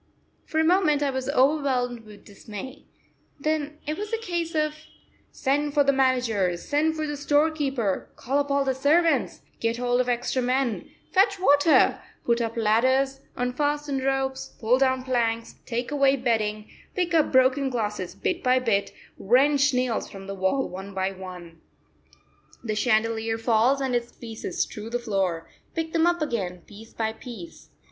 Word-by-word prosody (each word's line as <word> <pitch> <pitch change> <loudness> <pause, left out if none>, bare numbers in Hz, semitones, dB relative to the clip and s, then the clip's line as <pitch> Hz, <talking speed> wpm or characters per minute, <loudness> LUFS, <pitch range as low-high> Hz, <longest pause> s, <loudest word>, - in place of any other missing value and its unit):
For 315 - -4
a - - +4
moment 320 -4 +3
I 280 - +1
was 260 0 -3
overwhelmed 260 -4 +1
with 210 -1 -14
dismay; 215 +7 -9 0.5
then 305 0 -2
it 305 +4 -3
was 420 0 -5
a 455 - 0
case 345 -6 -3
of 305 -1 +1 0.6
send 290 +2 -1
for 290 - +5
the 280 0 +3
manager, 245 -9 +1
send 300 - 0
for 310 -1 -2
the 295 -1 -3
storekeeper, 290 -7 0
call 275 +4 -1
up 285 0 -1
all 280 0 +2
the 265 - +1
servants, 290 +1 +2 0.2
get 230 0 0
hold 245 0 +1
of 250 - -2
extra 245 +2 0
men, 250 -2 -1 0.2
fetch 390 0 +3
water, 290 -2 +4 0.2
put 235 0 +2
up 230 0 -3
ladders, 260 +5 +2 0.2
unfasten 290 +3 -1
ropes, 265 0 -2
pull 240 +2 +2
down 260 -1 +2
planks, 230 -3 -1
take 240 +2 -3
away 275 -2 +3
bedding, 220 -4 -1 0.3
pick 355 -2 0
up 315 -3 +3
broken 260 +1 +3
glass 215 -4 -2 0.2
bit 360 -1 -2
by 255 -1 +3
bit, 225 -6 0 0.3
wrench 280 +6 +4
nails 250 -2 -1
from 195 -1 -10
the 195 - -5
wall 195 +8 0
one 190 +2 -8
by 190 0 0
one. 180 -3 -10 1.0
The 220 -3 -2
chandelier 225 0 +1
falls 230 +4 +2
and 265 -2 -1
its 240 0 -2
pieces 225 -5 -4
strew 215 +1 -8
the 240 - -1
floor; 190 -8 -2 0.3
pick 325 0 -3
them 330 +1 +3
up 345 -2 +1
again 190 - -3
piece 220 +2 -13
by 220 -1 -2
piece. 220 -8 -11
255 Hz, 165 wpm, -25 LUFS, 225-290 Hz, 1.0 s, for